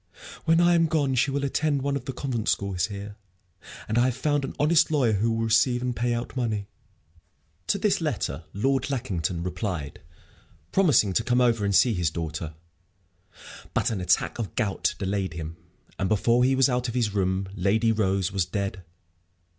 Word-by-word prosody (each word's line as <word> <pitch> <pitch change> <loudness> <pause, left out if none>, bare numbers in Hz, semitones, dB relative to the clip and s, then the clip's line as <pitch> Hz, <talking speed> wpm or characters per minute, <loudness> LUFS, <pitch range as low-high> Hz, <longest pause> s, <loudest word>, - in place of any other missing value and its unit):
When 165 0 +4
I 175 0 +5
am 165 -1 +4
gone 150 -4 +1
she 135 +3 +2
will 140 +1 -1
attend 140 0 0
one 140 0 0
of 130 -3 -4
the - - -3
convent 125 -4 -3
schools 95 -2 0
here. 100 0 -8 0.7
And 110 +2 +1
I 120 - +4
have 130 -1 -1
found 145 +1 0
an 135 - -5
honest 160 +3 +4
lawyer 140 -7 +2
who 105 +3 +1
will 115 0 -1
receive 120 +2 +2
and 125 -1 -2
pay 120 +1 0
out 120 +3 -3
money." 110 -5 -1 1.0
To - - +2
this - - +1
letter 75 +4 -2
Lord 135 +8 0
Lackington 90 - -2
replied, 90 -6 -4 0.7
promising 150 - +3
to 115 - +1
come 125 +1 +2
over 115 -4 +2
and 100 -1 +1
see 120 +3 +5
his 90 -5 0
daughter. 80 -1 -5 1.2
But - - +1
an 100 -4 -3
attack 90 - +1
of 110 - -4
gout 100 -3 0
delayed 95 -2 -2
him, 80 0 -6 0.4
and, 95 - 0
before 115 +3 +3
he 135 +1 +3
was 135 0 +4
out 125 -1 -1
of 120 - -5
his 115 -5 0
room, 95 -1 0
Lady 105 +4 +2
Rose 100 -3 0
was 95 -2 +1
dead. 100 0 -4
115 Hz, 185 wpm, -26 LUFS, 95-130 Hz, 1.2 s, I